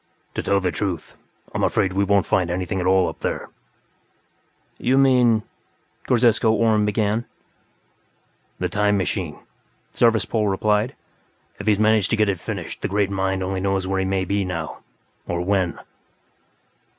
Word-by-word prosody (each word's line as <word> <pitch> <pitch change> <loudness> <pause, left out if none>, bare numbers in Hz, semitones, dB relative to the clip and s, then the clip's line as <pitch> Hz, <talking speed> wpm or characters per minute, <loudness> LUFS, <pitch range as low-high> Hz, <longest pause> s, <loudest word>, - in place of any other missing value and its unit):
"To - - -2
tell 100 - +2
the 90 -2 -1
truth, 90 -1 -4 0.4
I'm - - -1
afraid 95 -3 +1
we 100 +1 +1
won't 100 -1 +2
find 90 -2 +1
anything 90 +2 -2
at 90 - -1
all 95 -1 +4
up - - -6
there." - - -3 1.3
"You 130 +2 +2
mean...?" 125 -5 +4 0.6
Ghorzesko 115 -2 +3
Orhm 110 -2 +3
began. 105 +2 0 1.3
"The 90 - -1
'time 105 +2 +1
machine'," 90 -4 -2 0.6
Zarvas 115 -3 +3
Pol 110 -2 0
replied. 105 +5 +1 0.6
"If 100 - -7
he's 105 -2 +4
managed 110 -1 +3
to - - +2
get 105 -1 +3
it 95 -3 -1
finished, - - -6
the - - -1
Great 100 0 0
Mind 95 -1 -1
only 95 0 -2
knows 95 -1 0
where 95 0 -1
he 95 - 0
may 95 0 0
be, 100 +2 0
now. 85 -4 -5 0.5
Or 85 -1 -2
when." 95 -2 0
100 Hz, 155 wpm, -22 LUFS, 95-110 Hz, 1.3 s, all